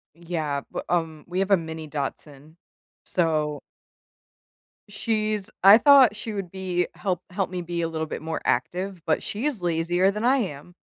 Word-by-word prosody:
Yeah, 160 Hz, -4 st, -3 dB
but, -, -, -5 dB
um, 165 Hz, -3 st, -1 dB
we 180 Hz, +1 st, -4 dB
have 195 Hz, +1 st, 0 dB
a 195 Hz, -, +7 dB
mini 160 Hz, -2 st, -6 dB
Dachshunds, 145 Hz, +1 st, -6 dB, 0.5 s
so 155 Hz, -4 st, 0 dB, 1.3 s
she's 215 Hz, -1 st, -2 dB
I 195 Hz, +2 st, +10 dB
thought 265 Hz, -4 st, +7 dB
she 215 Hz, +1 st, -6 dB
would 195 Hz, -4 st, -5 dB
be 185 Hz, -2 st, -1 dB
help 185 Hz, -3 st, -2 dB
help 190 Hz, 0 st, -2 dB
me 180 Hz, -1 st, -3 dB
be 170 Hz, 0 st, -3 dB
a 165 Hz, -, 0 dB
little 160 Hz, -1 st, -3 dB
bit 155 Hz, -, -6 dB
more 160 Hz, 0 st, -3 dB
active, 185 Hz, -1 st, -1 dB
but 160 Hz, -, +1 dB
she's 245 Hz, +2 st, -3 dB
lazier 175 Hz, +2 st, +2 dB
than 210 Hz, +3 st, -4 dB
I 265 Hz, +2 st, +4 dB
am. 175 Hz, -, -5 dB
175 Hz, 165 wpm, -25 LUFS, 160-200 Hz, 1.3 s, I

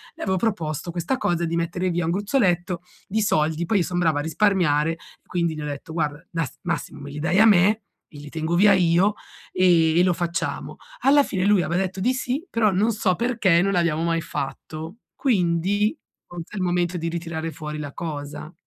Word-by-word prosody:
le -, -, -12 dB
avevo 190 Hz, -2 st, 0 dB
proposto 170 Hz, -6 st, -2 dB
questa 175 Hz, +10 st, -1 dB
cosa 175 Hz, -8 st, 0 dB
di 165 Hz, -, -2 dB
mettere 175 Hz, +2 st, -1 dB
via 175 Hz, -1 st, -1 dB
un 165 Hz, -, 0 dB
gruzzoletto 185 Hz, -4 st, 0 dB, 0.3 s
di 220 Hz, +3 st, 0 dB
soldi, 160 Hz, -3 st, +1 dB
poi 205 Hz, +4 st, +1 dB
io 180 Hz, -, +2 dB
sono 180 Hz, 0 st, -2 dB
brava 160 Hz, -4 st, +2 dB
a -, -, 0 dB
risparmiare, 165 Hz, -3 st, +2 dB, 0.3 s
quindi 170 Hz, -3 st, -1 dB
gli 155 Hz, -, -6 dB
ho -, -, -4 dB
detto: 145 Hz, +2 st, -6 dB
"Guarda 150 Hz, -1 st, -2 dB
nas 165 Hz, -6 st, -3 dB
massimo -, -, -3 dB
me 140 Hz, -, -8 dB
li 145 Hz, -, -6 dB
dai 175 Hz, +5 st, +1 dB
a 220 Hz, -, +7 dB
me, 210 Hz, +1 st, +4 dB, 0.3 s
e 150 Hz, -, -13 dB
li 145 Hz, 0 st, -10 dB
tengo 160 Hz, +2 st, -2 dB
via 200 Hz, +3 st, +6 dB
io 180 Hz, +3 st, +3 dB, 0.4 s
e 170 Hz, -3 st, +4 dB
e -, -, +6 dB
lo 180 Hz, -1 st, +3 dB
facciamo." 175 Hz, 0 st, -3 dB, 0.3 s
Alla 285 Hz, +1 st, +5 dB
fine 190 Hz, -6 st, -2 dB
lui 205 Hz, -3 st, +4 dB
aveva 175 Hz, +3 st, 0 dB
detto 190 Hz, 0 st, -3 dB
di 250 Hz, +6 st, +2 dB
sì 255 Hz, +6 st, -2 dB
però 225 Hz, -2 st, +2 dB
non 210 Hz, +5 st, +2 dB
so 200 Hz, -4 st, +1 dB
perché, 215 Hz, -6 st, +2 dB
non 195 Hz, +1 st, +1 dB
l'abbiamo 170 Hz, -3 st, +1 dB
mai 165 Hz, 0 st, 0 dB
fatto; 155 Hz, +5 st, -6 dB, 0.2 s
quindi 205 Hz, -, +1 dB, 0.3 s
forse 175 Hz, +1 st, -9 dB
è -, -, -5 dB
il 190 Hz, -, -1 dB
momento 175 Hz, 0 st, 0 dB
di 165 Hz, -, -3 dB
ritirare 165 Hz, -1 st, -4 dB
fuori 150 Hz, 0 st, -6 dB
la 145 Hz, -2 st, -6 dB
cosa. 150 Hz, 0 st, -6 dB
175 Hz, 205 wpm, -23 LUFS, 160-195 Hz, 0.4 s, a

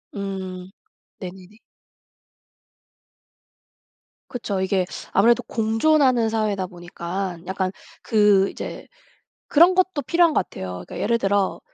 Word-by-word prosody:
음. 190 Hz, -2 st, -5 dB, 0.5 s
네네네. 185 Hz, +2 st, -10 dB, 2.7 s
그쵸. 205 Hz, -6 st, -3 dB
이게 190 Hz, -1 st, +1 dB, 0.3 s
아무래도 235 Hz, +5 st, +4 dB
공존하는 235 Hz, +2 st, +2 dB
사회다 210 Hz, -4 st, -1 dB
보니까 175 Hz, +1 st, -5 dB
약간 190 Hz, 0 st, -1 dB, 0.3 s
그 205 Hz, -3 st, +4 dB
이제 -, -, -7 dB, 0.6 s
그런 340 Hz, +5 st, +6 dB
것도 370 Hz, -5 st, +1 dB
필요한 335 Hz, +4 st, +3 dB
것 -, -, +1 dB
같아요. 90 Hz, -1 st, -7 dB
그러니까 -, -, -8 dB
예를 235 Hz, +1 st, +1 dB
들어 200 Hz, -2 st, 0 dB
200 Hz, 235 characters per minute, -23 LUFS, 185-235 Hz, 2.7 s, 그런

